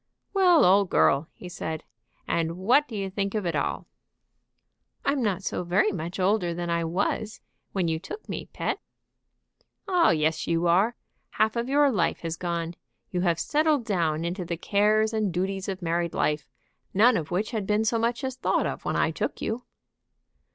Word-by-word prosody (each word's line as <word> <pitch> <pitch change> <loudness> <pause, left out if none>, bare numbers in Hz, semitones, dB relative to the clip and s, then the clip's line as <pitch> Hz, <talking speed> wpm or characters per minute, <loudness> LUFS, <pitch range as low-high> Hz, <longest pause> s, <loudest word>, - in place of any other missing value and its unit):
"Well, 365 -4 +5
old 195 +1 +5
girl!" 140 +3 +3
he 180 - -11
said, 160 -3 -5 0.4
"and 165 -1 +1
now 165 - -4
what 240 +11 +3
do 225 - -8
you 195 -2 -3
think 195 +1 -2
of 210 -3 -1
it 170 -2 -1
all?" 145 - -1 1.2
"I'm 280 -1 +1
not 200 -4 0
so 180 - -2
very 185 +5 +2
much 175 0 -5
older 185 -2 +1
than 175 0 -3
I 170 0 +1
was 200 +5 -1 0.3
when 185 -3 0
you 160 -1 0
took 425 - -9
me, - - -5
pet." - - -2 1.1
"Oh, 360 -3 +4
yes, 155 0 +1
you 170 +1 +1
are. 195 +8 +3 0.4
Half 215 +1 +2
of 235 +2 -2
your 285 0 +4
life 180 -8 0
has 165 -1 -3
gone; 170 -1 -3 0.4
you 180 - -1
have 170 -2 +1
settled 300 - +2
down 165 -6 0
into 180 +2 -3
the 170 0 -4
cares 215 +4 +2
and 215 -3 0
duties 190 +2 -2
of 190 -1 -5
married 170 0 -1
life, 150 0 0 0.5
none 230 +6 +6
of 160 -1 -2
which 195 +5 -1
had 215 -4 -3
been 210 +1 +2
so 230 +1 +1
much 235 +4 0
as 260 -1 -2
thought - - +1
of - - -4
when - - -1
I - - +2
took - - -3
you." 240 +3 -3
190 Hz, 185 wpm, -26 LUFS, 170-220 Hz, 1.2 s, none